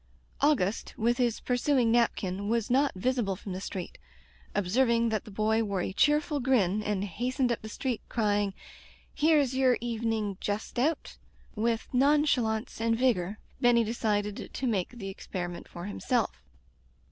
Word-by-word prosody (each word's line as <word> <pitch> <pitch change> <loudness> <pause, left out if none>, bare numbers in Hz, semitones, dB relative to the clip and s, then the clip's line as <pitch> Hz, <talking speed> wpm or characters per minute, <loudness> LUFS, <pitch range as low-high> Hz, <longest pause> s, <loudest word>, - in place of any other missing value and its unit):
Augustc, 245 -9 +1
with 240 +3 +1
his 240 -3 +1
pursuing 250 -1 +2
napkin, 205 -4 +1
was 230 0 0
not 275 +3 +3
visible 220 -1 0
from 190 +1 -7
the 185 - -5
street. 185 -2 -6 0.6
Ob 205 -3 0
serving 235 +2 +3
that 215 -2 -2
the - - -10
boy 220 +2 +1
wore 200 -3 -1
a - - -3
cheerful 295 +4 +2
grin 215 -7 +2
and 210 -2 -1
hastened 245 +5 -1
up 235 - -2
the 220 - -8
street 250 +2 -3
crying, 205 -3 +1 0.6
"Here's 295 -4 +3
ycr 260 -2 +3
evening 225 -4 -2
Just 210 +4 -3
Out,*' 305 +5 -1 0.3
with 225 +1 -1
nonchalance 255 -6 +2
and 230 0 +2
vigor^ 220 -6 +1 0.2
Benny 240 -1 +5
decided 210 -2 -1
to 265 - -4
make 205 -7 0
the 195 -6 -7
experi 175 -2 -5
ment 175 - -9
for 175 0 -8
himself. 225 +2 -1
225 Hz, 155 wpm, -29 LUFS, 205-250 Hz, 0.6 s, Benny